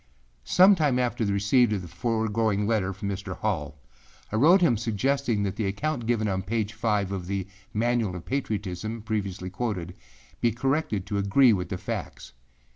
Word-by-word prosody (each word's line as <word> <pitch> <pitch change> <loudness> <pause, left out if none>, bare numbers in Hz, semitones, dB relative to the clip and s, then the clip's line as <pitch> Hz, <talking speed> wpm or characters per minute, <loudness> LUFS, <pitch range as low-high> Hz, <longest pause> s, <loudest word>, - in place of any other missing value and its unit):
Sometime 170 - +5
after 120 -2 0
the 100 - 0
receipt 105 +5 +3
of 100 -3 -2
the - - -8
foregoing 110 0 0
letter 105 -3 +1
from 100 +1 -6
Mr. 95 -2 -5
Hall, 80 -7 -2 0.5
I - - -2
wrote 165 - +6
him 150 -9 +4
suggesting 115 +1 0
that 100 -2 -3
the 110 - 0
account 120 +4 -2
given 115 -3 +1
on 95 -2 -1
page 110 +2 -2
5 105 -3 0
of 95 -3 -4
the 100 -1 -2 0.3
âManual 115 -3 +1
of 90 - -8
Patriotismâ 110 -4 -3
previously 100 -4 -3
quoted, 95 -5 -3 0.5
be 120 - +2
corrected 135 -5 -1
to 100 0 -2
agree 110 +5 +5
with 90 -3 -2
the 95 - -3
facts. - - -6
110 Hz, 170 wpm, -26 LUFS, 95-120 Hz, 0.5 s, wrote